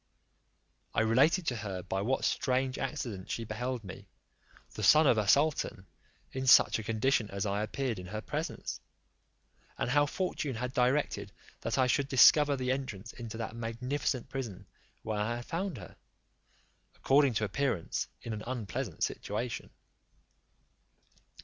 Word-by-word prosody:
I - - +3
related 135 +11 +3
to 125 -6 -1
her 100 -4 -5
by 95 - -2
what 130 +6 0
strange 130 0 0
accident 110 -10 -4
she 115 - -2
beheld 120 +2 -3
me, 95 - -10 0.7
the - - -6
son 155 +10 +6
of 120 -5 +4
a 105 - -1
sultan, 140 -7 +2 0.5
in 130 0 -4
such 130 - +7
a - - -5
condition 115 +1 +1
as 100 0 -3
I 100 0 0
appeared 115 0 -2
in 90 - -8
her 105 +3 -4
presence; - - -4 1.0
and 120 - -1
how 145 +1 +4
fortune 150 -5 -2
had 125 +2 -4
directed 130 +4 +1 0.3
that - - -2
I 130 - +4
should 135 +2 +1
discover 140 +2 +6
the 130 0 -1
entrance 115 -5 -4
into 115 -2 -7
that 115 -1 -5
magnificent 125 +3 -2
prison 115 -8 -6 0.4
where 110 -1 -2
I 110 +3 0
had 120 0 -7
found 175 -3 -3
her, 90 -4 -11 1.0
according 135 -3 +3
to 110 - +1
appearance, 105 -3 -1 0.2
in 115 - -4
an 105 - -5
unpleasant 120 - -3
situation. 110 +3 -3
120 Hz, 150 wpm, -31 LUFS, 105-135 Hz, 1.0 s, such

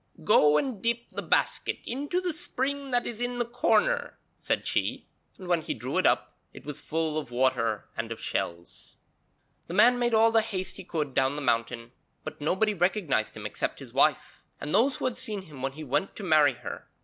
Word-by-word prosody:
'Go 150 0 +5
and 250 - -2
dip 235 0 -1
the - - -4
basket - - 0
into 290 +8 -2
the 360 -2 -1
spring 280 -4 -2
that 245 -1 +3
is 235 0 -3
in 245 0 -1
the 240 - +2
corner,' 245 - +1 0.2
said - - -2
she, - - -1 0.3
and 185 - -10
when 175 -2 +2
he - - -4
drew - - -2
it - - +4
up - - 0
it - - -12
was 150 -1 -5
full 160 -1 -1
of 150 - -8
water 120 -4 0
and 115 0 -4
of 115 - -5
shells. 85 0 -4 0.7
The 170 - -5
man 245 +5 +6
made 240 -1 +2
all 225 +1 +5
the 225 0 +4
haste 185 -3 -4
he 195 - -8
could 150 -6 -3
down 135 +2 +2
the 150 - -4
mountain, 115 -1 -1 0.3
but - - -8
nobody 190 +8 +1
recognised 175 - 0
him 105 - -8
except 105 - -3
his - - -11
wife, - - +1 0.2
and 145 - -5
those 260 +4 +4
who - - -4
had 255 -2 -1
seen 205 -3 -1
him 150 -7 -12
when 135 0 -2
he 155 +2 -8
went 150 +7 -1
to 210 - -7
marry 155 -6 +5
her. 120 -1 -8
180 Hz, 210 wpm, -28 LUFS, -, 0.7 s, man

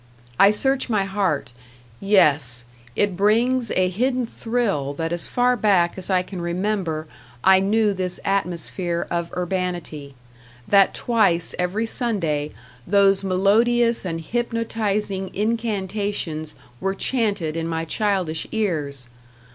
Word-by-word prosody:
I 200 - +8
search 265 +5 0
my 210 -4 +2
heart; 190 -11 -1 0.5
yes, 145 - +2 0.3
it 205 -3 +1
brings 230 +5 +2
a 185 0 +2
hidden 250 +7 0
thrill 225 - -2
that 165 +2 -2
as 175 - 0
far 250 0 +2
back 195 -6 +2
as 190 0 -7
I 185 -1 +2
can 180 -1 -7
remember 175 -2 -2 0.4
I 190 0 +6
knew 210 +2 +2
this 185 -1 -2
atmosphere 175 -2 -1
of 170 -1 -2
urbanity, 175 -6 -3 0.5
that 195 -1 +4
twice 200 -8 +1
every 185 +6 0
Sunday 170 -12 -1 0.4
those 195 0 +4
melodious 230 +5 +3
and 165 -3 -3
hypnotizing 215 -2 -2
incantations 205 -7 -2 0.2
were 195 0 -1
chanted 205 -9 -1
in 165 0 -2
my 165 0 -2
childish 185 -3 -1
ears! 150 - -2
195 Hz, 120 wpm, -22 LUFS, 170-215 Hz, 0.5 s, I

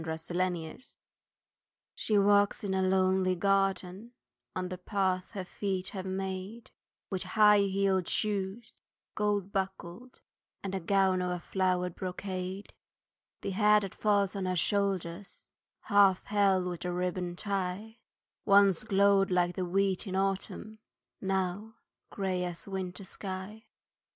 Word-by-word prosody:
THE 160 0 -4
OLD 185 +1 +1
MAID 165 +7 -8 1.1
She 215 - 0
walks 205 +1 +3
in 195 -2 -1
a 190 - +1
lonely 185 0 +2
garden 195 +3 0 0.4
On 185 -1 -2
the 180 -1 -6
path 185 -2 -1
her 190 -3 -4
feet 190 0 -3
have 190 -1 -6
made, 190 +4 -5 0.4
With 190 -2 -2
high 210 +2 +5
heeled 195 -2 +1
shoes, 210 +1 -2 0.3
gold 205 -2 0
buckled, 195 +4 -5 0.4
And 190 -3 -4
gown 190 -2 +3
of 180 - -1
a 180 0 -2
flowered 180 -1 0
brocade; 185 +1 -5 0.7
The - - -3
hair 210 +2 +5
that 195 -2 -5
falls 205 -2 +1
on 195 -1 -2
her 185 0 0
shoulders, 195 0 -1 0.3
Half 200 -3 +4
held 195 -3 +2
with 175 -1 -4
a 180 - -2
ribbon 180 0 -2
tie, 200 +3 -3 0.4
Once 200 -2 +5
glowed 200 -2 +3
like 180 -1 +1
the 185 - -2
wheat 195 +3 0
in 190 - -3
autumn, 195 +3 -2 0.4
Now 195 +3 -2 0.3
grey 190 -2 -2
as 175 -1 -5
a 200 - -11
winter 190 0 -4
sky. 190 +3 -7
190 Hz, 135 wpm, -30 LUFS, 185-200 Hz, 1.1 s, high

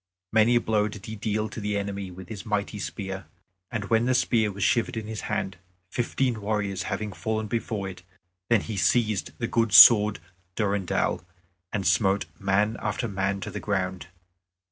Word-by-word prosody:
Many 110 +2 +4
a - - +5
blow 105 -2 +1
did 105 -1 -9
he 110 - -6
deal 110 0 -1
to 110 - -7
the 105 0 -1
enemy 100 -1 -4
with 90 0 -10
his 105 -1 -7
mighty 105 -2 -2
spear, 95 +2 -5 0.4
and 110 -4 -3
when 115 +1 +3
the 130 0 +2
spear 110 -3 +2
was 100 -1 -4
shivered 115 +2 +1
in 110 - -4
his 110 0 -5
hand, 95 - -2 0.3
fifteen 120 -1 -1
warriors 100 -2 -1
having 105 0 -3
fallen 110 +1 -2
before 105 -2 -3
it, 90 -1 -9 0.5
then 115 -4 +4
he 110 -3 -5
seized 110 -2 +1
his 120 - -3
good 115 -2 +2
sword 105 -2 +9 0.4
Durendal, 100 -4 0 0.5
and 100 -3 -2
smote 95 +4 +2
man 100 +3 +1
after 105 +3 -2
man 100 -1 -2
to 105 - -5
the 105 - -5
ground. 95 -4 -2
105 Hz, 175 wpm, -26 LUFS, 100-110 Hz, 0.5 s, sword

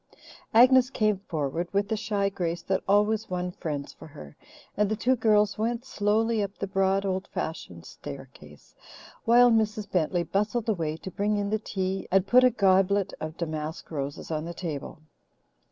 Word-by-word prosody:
Agnes 255 +2 +6
came 215 -6 +1
forward 160 +2 -2
with 200 0 +2
the 220 - -1
shy 210 -2 -1
grace 175 -3 -3
that 190 0 0
always 210 +2 +2
won 180 0 -2
friends 145 -5 -5
for - - -13
her, 75 - -12 0.4
and 210 -1 +1
the 215 - 0
two 250 +5 +2
girls 210 -3 +2
went 235 +3 -1
slowly 220 -1 +1
up 200 0 -4
the - - -3
broad, 195 0 +1
old 190 0 -2
fashioned 90 - -6
staircase, - - -11 0.5
while 240 +1 +6
Mrs. 215 -2 +1
Bentley 175 0 +1
bustled 210 +5 -1
away 165 -7 -1
to 190 - -8
bring 205 +3 0
in 205 0 -2
the 215 - +1
tea 190 -2 -3
and 190 0 +3
put 250 +5 +5
a 255 - +7
goblet 195 -3 +2
of 155 +1 -6
damask 155 -1 -5
roses 145 +1 -5
on 155 -1 -2
the 170 0 -6
table. 155 -3 -6
195 Hz, 170 wpm, -27 LUFS, 170-215 Hz, 0.5 s, a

